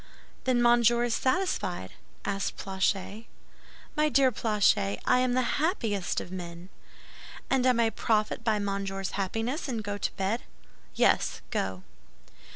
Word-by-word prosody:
"Then 250 Hz, -2 st, +3 dB
Monsieur 240 Hz, 0 st, +5 dB
is 240 Hz, -1 st, 0 dB
satisfied?" 360 Hz, +12 st, -1 dB, 0.3 s
asked 195 Hz, -1 st, -2 dB
Planchet. 195 Hz, +3 st, -2 dB, 0.7 s
"My 305 Hz, 0 st, +3 dB
dear 275 Hz, -2 st, +4 dB
Planchet, 200 Hz, -, +2 dB
I 250 Hz, -, +4 dB
am 255 Hz, -1 st, +2 dB
the 255 Hz, 0 st, +2 dB, 0.2 s
happiest 225 Hz, -, 0 dB
of 175 Hz, -, -8 dB
men!" 175 Hz, -1 st, -7 dB, 0.8 s
"And 260 Hz, -1 st, +3 dB
I -, -, +7 dB
may 230 Hz, -1 st, +2 dB
profit 215 Hz, 0 st, 0 dB
by 220 Hz, -2 st, +2 dB
Monsieur's 195 Hz, -1 st, -3 dB
happiness, 225 Hz, -, -2 dB
and 230 Hz, -5 st, -3 dB
go 205 Hz, 0 st, -4 dB
to -, -, -1 dB
bed?" 195 Hz, +5 st, -1 dB, 0.5 s
"Yes, -, -, +2 dB
go." 95 Hz, -1 st, -2 dB
220 Hz, 135 wpm, -28 LUFS, 195-245 Hz, 0.8 s, I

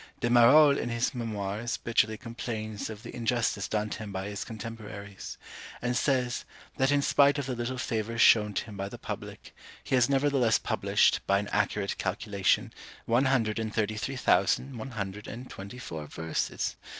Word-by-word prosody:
De 120 Hz, -, 0 dB
Marolles 140 Hz, +5 st, +7 dB
in -, -, -2 dB
his 115 Hz, +1 st, 0 dB
Memoirs 110 Hz, -1 st, -3 dB
bitterly 110 Hz, -1 st, +1 dB
complains 110 Hz, -3 st, -5 dB
of 110 Hz, -1 st, -8 dB
the -, -, -8 dB
injustice 115 Hz, -4 st, 0 dB
done 105 Hz, 0 st, -1 dB
to -, -, -4 dB
him 105 Hz, -2 st, -6 dB
by 95 Hz, 0 st, -4 dB
his 100 Hz, -1 st, -4 dB
contemporaries; 105 Hz, -3 st, -8 dB, 0.4 s
and 125 Hz, 0 st, -1 dB
says, 125 Hz, -2 st, +1 dB, 0.3 s
that 135 Hz, 0 st, +3 dB
in 145 Hz, -1 st, +3 dB
spite 140 Hz, +2 st, +4 dB
of 140 Hz, -, -2 dB
the 130 Hz, -1 st, -3 dB
little 120 Hz, +2 st, -3 dB
favour 115 Hz, -2 st, -2 dB
shown 105 Hz, -2 st, +6 dB
to 100 Hz, -, -2 dB
him 105 Hz, -3 st, -10 dB
by 100 Hz, 0 st, -4 dB
the -, -, -8 dB
public, -, -, -8 dB, 0.3 s
he -, -, -5 dB
has 125 Hz, -1 st, +4 dB
nevertheless 135 Hz, -5 st, +3 dB
published, -, -, +2 dB
by 100 Hz, -, +4 dB
an 100 Hz, +1 st, -2 dB
accurate 105 Hz, -1 st, 0 dB
calculation, 100 Hz, +1 st, 0 dB, 0.3 s
one 120 Hz, +4 st, +3 dB
hundred 115 Hz, -5 st, +1 dB
and 110 Hz, -1 st, -3 dB
thirty 110 Hz, -1 st, 0 dB
three 110 Hz, +6 st, -3 dB
thousand 130 Hz, 0 st, +2 dB
one 115 Hz, +3 st, -6 dB
hundred 100 Hz, +1 st, -4 dB
and 125 Hz, +3 st, -8 dB
twenty 100 Hz, +5 st, -8 dB
four 80 Hz, -11 st, -6 dB
verses! 80 Hz, +2 st, -3 dB
115 Hz, 180 wpm, -29 LUFS, 105-125 Hz, 0.4 s, Marolles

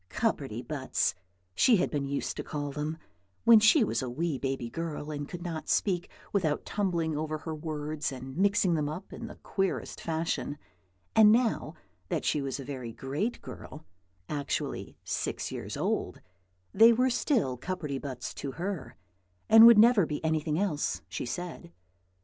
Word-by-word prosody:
"Cupperty 135 Hz, -, -1 dB
buts," 140 Hz, -4 st, 0 dB, 0.4 s
she 235 Hz, -, +5 dB
had 180 Hz, -, 0 dB
been 140 Hz, -2 st, -1 dB
used 140 Hz, 0 st, -2 dB
to -, -, -3 dB
call 145 Hz, -1 st, -4 dB
them, 150 Hz, +3 st, -3 dB, 0.5 s
when 230 Hz, -1 st, +8 dB
she 220 Hz, +6 st, +6 dB
was 210 Hz, -, 0 dB
a 130 Hz, -, -3 dB
wee 150 Hz, +2 st, -2 dB
baby 135 Hz, -3 st, -2 dB
girl 155 Hz, +2 st, -5 dB
and 145 Hz, -1 st, -5 dB
could 175 Hz, -1 st, -7 dB
not 165 Hz, -3 st, -5 dB
speak 180 Hz, -4 st, +1 dB, 0.2 s
without 160 Hz, -7 st, 0 dB
tumbling 170 Hz, -6 st, -1 dB
over 155 Hz, +1 st, -2 dB
her 160 Hz, +1 st, -6 dB
words 150 Hz, -1 st, -3 dB
and 130 Hz, 0 st, -8 dB
mixing 195 Hz, 0 st, +3 dB
them 150 Hz, -2 st, 0 dB
up 180 Hz, +6 st, -7 dB
in 230 Hz, -, -6 dB
the -, -, -10 dB
queerest 195 Hz, -1 st, -2 dB
fashion; 160 Hz, -2 st, -2 dB, 0.6 s
and 215 Hz, -1 st, +8 dB
now 235 Hz, 0 st, +1 dB, 0.3 s
that -, -, -1 dB
she 150 Hz, -, +1 dB
was 135 Hz, 0 st, -3 dB
a 135 Hz, -, -6 dB
very 130 Hz, -4 st, -5 dB
great 145 Hz, -, -3 dB
girl, 155 Hz, +1 st, -10 dB, 0.4 s
actually 145 Hz, -2 st, -3 dB
six -, -, -3 dB
years -, -, -5 dB
old, -, -, -1 dB, 0.5 s
they 225 Hz, +1 st, +8 dB
were 250 Hz, +3 st, +3 dB
still 235 Hz, -, +1 dB
cupperty 150 Hz, -1 st, -4 dB
buts 130 Hz, -4 st, -5 dB
to 135 Hz, -2 st, -5 dB
her, 185 Hz, 0 st, -4 dB, 0.5 s
and 225 Hz, +1 st, +10 dB
would 235 Hz, -2 st, +9 dB
never 215 Hz, -5 st, +6 dB
be 150 Hz, +1 st, -4 dB
anything 155 Hz, -1 st, 0 dB
else, 175 Hz, -6 st, -1 dB
she -, -, -4 dB
said. 175 Hz, -, -6 dB
155 Hz, 165 wpm, -29 LUFS, 145-195 Hz, 0.6 s, and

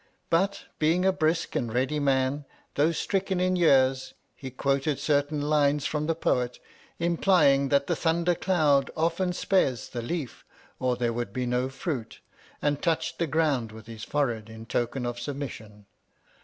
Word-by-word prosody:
But, 195 Hz, +4 st, +1 dB, 0.2 s
being 165 Hz, +4 st, +2 dB
a 190 Hz, -, +5 dB
brisk 160 Hz, 0 st, 0 dB
and 120 Hz, -3 st, -1 dB
ready 130 Hz, +5 st, 0 dB
man, 135 Hz, 0 st, +1 dB, 0.3 s
though 150 Hz, +4 st, +3 dB
stricken 190 Hz, +2 st, -1 dB
in 185 Hz, 0 st, +2 dB
years, 130 Hz, -6 st, +3 dB, 0.2 s
he 135 Hz, -, -8 dB
quoted 140 Hz, +2 st, 0 dB
certain 145 Hz, 0 st, 0 dB
lines 145 Hz, -1 st, +2 dB
from 150 Hz, 0 st, -1 dB
the 165 Hz, -, +1 dB
Poet, 125 Hz, -6 st, 0 dB, 0.4 s
implying 165 Hz, -5 st, +3 dB
that 140 Hz, -1 st, +3 dB
the -, -, 0 dB
thunder 170 Hz, +1 st, +1 dB
cloud 155 Hz, -7 st, +2 dB
often 170 Hz, +3 st, +1 dB
spares 175 Hz, -9 st, 0 dB
the 120 Hz, -, -4 dB
leaf 140 Hz, +1 st, -5 dB, 0.4 s
or 125 Hz, -1 st, +1 dB
there 120 Hz, -1 st, -1 dB
would 120 Hz, -3 st, -3 dB
be 125 Hz, +4 st, -2 dB
no 125 Hz, +1 st, 0 dB
fruit, 135 Hz, -4 st, -5 dB, 0.4 s
and 145 Hz, -1 st, +1 dB
touched 165 Hz, -3 st, -1 dB
the 170 Hz, -, +1 dB
ground 145 Hz, -7 st, +1 dB
with 110 Hz, 0 st, -12 dB
his 115 Hz, -1 st, -9 dB
forehead 120 Hz, -6 st, -1 dB
in 110 Hz, 0 st, -10 dB
token 120 Hz, +2 st, -2 dB
of 120 Hz, 0 st, -3 dB
sub 135 Hz, +3 st, -4 dB
mission. 110 Hz, -7 st, -8 dB
140 Hz, 165 wpm, -27 LUFS, 125-165 Hz, 0.4 s, a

